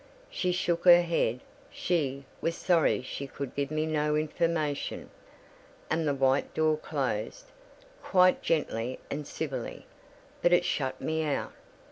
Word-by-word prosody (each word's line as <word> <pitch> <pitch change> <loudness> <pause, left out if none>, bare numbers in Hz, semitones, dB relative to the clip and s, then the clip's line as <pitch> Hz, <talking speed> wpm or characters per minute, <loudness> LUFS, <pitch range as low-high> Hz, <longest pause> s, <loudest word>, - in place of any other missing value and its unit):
She 180 - 0
shook 175 -1 -1
her 175 -1 +9
head, 125 -8 0 0.3
she 140 -6 -1 0.2
"was 165 0 0
sorry 170 -7 +2
she 135 +2 -5
could 135 -1 -6
give 140 -1 -2
me 155 0 -1
no 150 -1 0
information," 155 -1 -1 0.8
and 160 0 +1
the 145 - +1
white 135 0 +2
door 155 0 +3
closed, 135 -8 -3 0.5
quite 185 -1 +4
gently 130 -6 -1
and 145 +1 -4
civilly: 135 -7 -5 0.6
but 175 - +4
it 175 0 +4
shut 130 -7 -1
me 160 0 -1
out. 150 -2 -2
155 Hz, 135 wpm, -29 LUFS, 140-170 Hz, 0.8 s, her